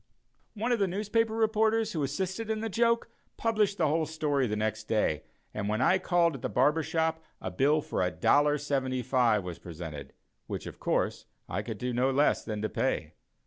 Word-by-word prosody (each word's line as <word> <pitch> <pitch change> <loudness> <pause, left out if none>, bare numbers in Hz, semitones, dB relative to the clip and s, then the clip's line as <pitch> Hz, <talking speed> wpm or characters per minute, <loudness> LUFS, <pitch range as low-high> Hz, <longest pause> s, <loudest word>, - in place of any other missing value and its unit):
One 225 +4 -1
of 240 - +2
the 200 - +3
newspaper 215 +4 0
reporters, 220 0 +2
who 160 - -2
assisted 190 +9 -2
in 220 -1 -1
the 225 - -2
joke, 230 +2 +1 0.3
published 215 -3 +1
the 160 - +2
whole 155 +1 +1
story 145 -4 0
the 105 - -1
next 110 0 -2
day, 105 -9 +1 0.3
and 105 -1 -2
when 110 +1 0
I 185 +9 +4
called 175 -2 +2
at 135 - -7
the - - -2
barber 150 +5 +3
shop 160 0 -1 0.2
a - - -5
bill 150 +3 +3
for - - -4
$1.75 130 0 +2
was 90 -2 -6
presented, 80 -5 -8 0.3
which, - - -5
of - - -9
course, - - -1 0.2
I 95 - -2
could 110 0 -6
do 125 +3 -3
no 125 +2 +2
less 140 +2 +2
than 105 -2 -4
to 110 - 0
pay. - - -1
150 Hz, 185 wpm, -29 LUFS, -, 0.3 s, I